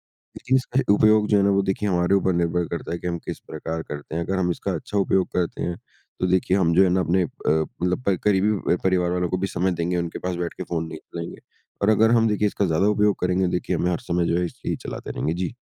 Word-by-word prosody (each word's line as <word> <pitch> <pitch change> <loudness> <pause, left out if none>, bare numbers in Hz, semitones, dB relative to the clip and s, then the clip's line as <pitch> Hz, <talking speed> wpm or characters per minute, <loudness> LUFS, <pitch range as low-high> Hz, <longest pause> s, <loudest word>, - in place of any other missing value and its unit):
लेकिन 130 - -3
इसका 130 0 -1
उपयोग 110 0 +4
जो 105 - +3
है 100 - +3
ना 100 - +4
वो 100 - +3
देखिए 100 +2 -1
हमारे 90 +2 +2
ऊपर 95 -1 +2
निर्भर 85 0 0
करता 85 - -5
है 85 - -2
कि 90 - -5
हम 85 -1 -1
किस - - -5
प्रकार 80 0 -4
करते 75 +2 -7
हैं। 85 - -1
अगर 95 +2 -2
हम 90 -1 +1
इसका - - -3
अच्छा 105 - -4
उपयोग 95 -1 +2
करते 90 -2 -1
हैं 85 - -2 0.4
तो 90 - +1
देखिए 95 +1 +2
हम 85 -3 +2
जो 95 - +7
है 95 - +3
ना 95 +1 +2
अपने 90 +2 +2
अ, - - -2 0.2
मतलब 90 +7 0
प 95 - +4
करीबी 105 -1 +2
अ, - - +1
परिवार 90 -2 +2
वालों 90 -1 0
को 90 - 0
भी 95 - -1
समय 95 0 0
देंगे। 85 +1 -1
उनके 85 -1 -3
पास 90 -1 -3
बैठके 85 -1 -4
फ़ोन 80 -1 -3
नहीं - - -7
चलाएँगे। 85 0 -8 0.4
और 100 - +3
अगर 110 +1 +4
हम 115 -1 +4
देखिए 105 0 +1
इसका 100 0 0
ज़्यादा 85 +4 +2
उपयोग 105 -1 +3
करेंगे 90 +1 +1
देखिए 90 0 -1
हमें 90 +1 0
हर - - -1
समय 90 -7 -1
जो 85 - +1
है 90 - +1
ये 85 - -5
ही - - 0
चलाते - - -6
रहेंगे। 80 - -2
जी। 90 +4 -3
90 Hz, 265 wpm, -23 LUFS, 85-100 Hz, 0.4 s, जो